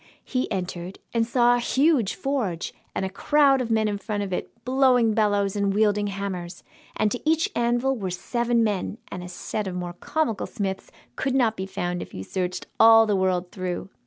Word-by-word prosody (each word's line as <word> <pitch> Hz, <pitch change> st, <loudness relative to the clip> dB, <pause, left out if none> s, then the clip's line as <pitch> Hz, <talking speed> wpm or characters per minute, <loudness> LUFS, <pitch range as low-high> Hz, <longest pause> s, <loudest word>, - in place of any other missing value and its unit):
He 255 Hz, -1 st, -2 dB
entered, 180 Hz, -1 st, -4 dB, 0.2 s
and 230 Hz, -1 st, +1 dB
saw 240 Hz, 0 st, +4 dB
a -, -, 0 dB
huge 265 Hz, -, +2 dB
forge, 235 Hz, -12 st, -2 dB, 0.2 s
and -, -, -1 dB
a -, -, -2 dB
crowd 275 Hz, +5 st, +3 dB
of 240 Hz, -, -3 dB
men 220 Hz, -1 st, +2 dB
in 205 Hz, -1 st, -2 dB
front 205 Hz, 0 st, -3 dB
of 190 Hz, -2 st, -4 dB
it, -, -, -3 dB, 0.2 s
blowing 255 Hz, -3 st, +4 dB
bellows 205 Hz, -2 st, +1 dB
and 200 Hz, -1 st, +1 dB
wielding 210 Hz, -1 st, +2 dB
hammers, 190 Hz, -3 st, -5 dB, 0.3 s
and 210 Hz, -, +1 dB
to 245 Hz, -, -3 dB
each 320 Hz, +1 st, +2 dB
anvil 240 Hz, +3 st, +1 dB
were 195 Hz, -6 st, -3 dB
seven 235 Hz, +6 st, 0 dB
men, 210 Hz, 0 st, -1 dB
and 180 Hz, -, -5 dB
a -, -, -7 dB
set 200 Hz, +3 st, -4 dB
of 185 Hz, -, -4 dB
more 175 Hz, -1 st, -4 dB
comical 260 Hz, -, -2 dB
smiths 195 Hz, -4 st, -4 dB, 0.3 s
could 270 Hz, -1 st, -1 dB
not 235 Hz, -4 st, +3 dB
be 190 Hz, -2 st, -4 dB
found 180 Hz, -2 st, -3 dB
if -, -, -9 dB
you 95 Hz, -, -5 dB
searched 180 Hz, -, -3 dB
all 225 Hz, 0 st, +8 dB
the 210 Hz, -2 st, +1 dB
world 185 Hz, -1 st, 0 dB
through! 185 Hz, 0 st, -4 dB
210 Hz, 195 wpm, -25 LUFS, 190-240 Hz, 0.3 s, all